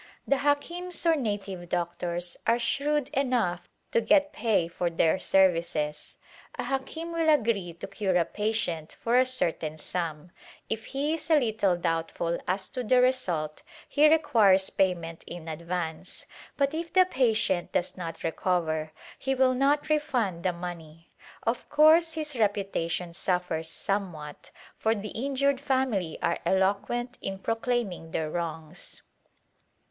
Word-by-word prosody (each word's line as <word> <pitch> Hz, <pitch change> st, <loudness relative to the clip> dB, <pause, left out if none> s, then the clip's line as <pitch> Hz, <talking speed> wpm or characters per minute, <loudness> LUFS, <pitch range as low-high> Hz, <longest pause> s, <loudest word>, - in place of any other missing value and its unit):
The 275 Hz, -, +3 dB
Hakims 340 Hz, +6 st, -1 dB
or 330 Hz, -1 st, +5 dB
native 200 Hz, -, -3 dB
doctors 175 Hz, 0 st, -2 dB
are 230 Hz, +1 st, +4 dB
shrewd 280 Hz, +4 st, 0 dB
enough 245 Hz, -11 st, 0 dB, 0.2 s
to 230 Hz, -, +3 dB
get 290 Hz, +6 st, +3 dB
pay 200 Hz, -8 st, +1 dB
for 170 Hz, +1 st, -2 dB
their 165 Hz, +2 st, +2 dB
services. 170 Hz, -5 st, +1 dB, 0.4 s
A -, -, -2 dB
hakim 270 Hz, +6 st, -3 dB
will 330 Hz, -1 st, +1 dB
agree 220 Hz, -, +2 dB
to 170 Hz, -, -8 dB
cure 195 Hz, -1 st, -1 dB
a 170 Hz, -, +3 dB
patient 210 Hz, -7 st, -2 dB
for 235 Hz, +1 st, +1 dB
a 255 Hz, -, +4 dB
certain 165 Hz, -10 st, -1 dB
sum; 165 Hz, 0 st, -4 dB, 0.4 s
if 220 Hz, 0 st, -2 dB
he 285 Hz, +3 st, -1 dB
is 325 Hz, -, -4 dB
a 315 Hz, -2 st, +6 dB
little 220 Hz, -7 st, +1 dB
doubtful 165 Hz, 0 st, -1 dB
as 190 Hz, +1 st, -1 dB
to 255 Hz, -, -4 dB
the 250 Hz, +2 st, +4 dB
result 185 Hz, -13 st, +1 dB, 0.3 s
he 300 Hz, +2 st, +5 dB
requires 215 Hz, -12 st, +4 dB
payment 170 Hz, -3 st, 0 dB
in 170 Hz, -2 st, -8 dB
ad 160 Hz, 0 st, -5 dB
vance, 170 Hz, -1 st, -4 dB, 0.3 s
but 280 Hz, 0 st, +2 dB
if 330 Hz, +1 st, -4 dB
the 370 Hz, 0 st, +6 dB
patient 225 Hz, -, +1 dB
does 175 Hz, -, -1 dB
not 170 Hz, -3 st, -6 dB
recover 160 Hz, -2 st, 0 dB, 0.3 s
he 270 Hz, 0 st, 0 dB
will 260 Hz, 0 st, +4 dB
not 280 Hz, +4 st, +2 dB
refund 255 Hz, -, 0 dB
the 185 Hz, -, +1 dB
money; 170 Hz, -2 st, -8 dB, 0.3 s
of 235 Hz, +1 st, -2 dB
course 320 Hz, +2 st, +6 dB
his 305 Hz, -3 st, -3 dB
reputation 195 Hz, -5 st, -1 dB
suffers 180 Hz, -3 st, -1 dB
somewhat, 170 Hz, -7 st, -3 dB, 0.3 s
for 220 Hz, +1 st, +2 dB
the 210 Hz, 0 st, -5 dB
injured 275 Hz, +2 st, 0 dB
family 260 Hz, -, 0 dB
are 170 Hz, -, +1 dB
eloquent 205 Hz, +6 st, 0 dB
in 195 Hz, 0 st, -3 dB
pro 225 Hz, -, -1 dB
claiming 225 Hz, -8 st, -2 dB
their 160 Hz, -1 st, -2 dB
wrongs. 160 Hz, -2 st, -4 dB
200 Hz, 145 wpm, -28 LUFS, 170-265 Hz, 0.4 s, a